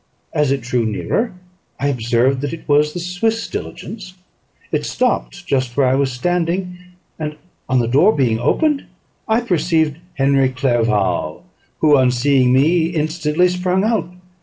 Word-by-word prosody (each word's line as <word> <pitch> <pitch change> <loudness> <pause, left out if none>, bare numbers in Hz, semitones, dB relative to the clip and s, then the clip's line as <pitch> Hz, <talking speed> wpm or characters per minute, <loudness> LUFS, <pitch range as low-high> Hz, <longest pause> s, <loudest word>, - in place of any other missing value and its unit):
As 150 -3 +1
it 135 -1 0
drew 125 0 -1
nearer, 115 - -1 0.5
I 140 - +1
observed 125 +1 +1
that 145 +1 -3
it 165 - -9
was 150 +1 +3
the 175 - -5
Swiss 210 +6 -1
diligence: 190 -4 -7 0.6
it - - 0
stopped - - -1
just 130 -2 -1
where 140 - +4
I 130 - +3
was 135 0 +1
standing; 175 +6 -1 0.4
and, 150 -1 -4 0.3
on 130 - +2
the 120 -2 +1
door 145 - +4
being 120 -5 +1
opened, 295 - +1 0.4
I 220 +1 +2
perceived 160 -7 0 0.2
Henry 135 -1 +3
Clerval, 110 - 0 0.4
who, 150 -2 +5
on 130 -1 +4
seeing 125 0 +2
me, 160 +6 +3
instantly 160 +1 0
sprung 180 +1 0
out. 215 -6 0
145 Hz, 150 wpm, -18 LUFS, 130-180 Hz, 0.6 s, who